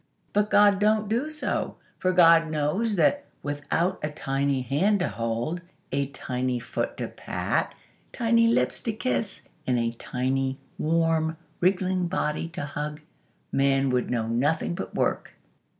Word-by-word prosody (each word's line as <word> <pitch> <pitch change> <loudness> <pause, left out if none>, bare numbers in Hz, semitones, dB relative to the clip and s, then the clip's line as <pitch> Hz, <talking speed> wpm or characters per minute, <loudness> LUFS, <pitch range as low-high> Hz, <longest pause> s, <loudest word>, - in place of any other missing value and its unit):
But 210 +1 +2
God 205 -1 +5
don't 215 0 +3
do 240 +8 0
so; 310 -1 -2 0.2
for 185 - +2
God 165 -2 +6
knows 155 +9 0
that, 240 - +3 0.2
without 145 +5 -1
a 150 - -1
tiny 135 -2 -1
hand 180 - +2
to - - +1
hold, 115 +9 -2 0.3
a 140 0 0
tiny 125 -2 -2
foot 120 - -3
to - - -3
pat, - - -2 0.4
tiny 230 -1 +3
lips 230 - +2
to 225 - -2
kiss, 220 -2 -2 0.2
and 125 -1 +2
a 115 -1 +1
tiny, 130 +3 -1 0.2
warm, 160 0 +1 0.2
wriggling 185 0 +2
body 165 -3 -1
to 170 -3 -5
hug, 150 +1 -5 0.5
Man 135 -1 +2
would 125 -1 0
know 115 -2 0
nothing 145 +9 +1
but - - -6
work." - - 0
160 Hz, 145 wpm, -26 LUFS, 135-195 Hz, 0.5 s, God